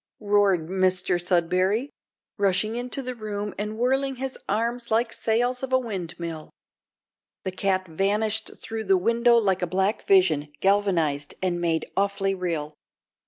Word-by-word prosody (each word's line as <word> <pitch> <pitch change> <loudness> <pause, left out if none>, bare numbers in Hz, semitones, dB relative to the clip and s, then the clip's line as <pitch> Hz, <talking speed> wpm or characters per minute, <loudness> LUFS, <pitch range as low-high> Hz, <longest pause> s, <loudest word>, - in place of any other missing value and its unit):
roared 200 -5 +3
Mr 185 -1 +1
Sudberry, 185 +7 +1 0.5
rushing 200 +2 +1
into 250 +3 -2
the 255 0 -4
room 210 -3 -5
and 210 +1 -3
whirling 265 +3 +1
his 265 +1 -3
arms 235 +3 -1
like 230 +2 +2
the - - -8
sails 245 +3 +1
of 265 -1 -4
a 260 - +5
windmill. 170 -8 -5 0.9
The 190 - -2
cat 185 0 0
vanished 210 +6 0
through 220 -1 -5
the 190 -1 +4
window 235 +5 +3
like 195 -5 +2
a 180 - 0
black 190 +4 -1
vision 170 -7 +4
galvanised 175 -8 +1
and 175 -2 0
made 165 -2 0
awfully 195 0 +1
real. 165 -5 -3
200 Hz, 145 wpm, -25 LUFS, 180-225 Hz, 0.9 s, a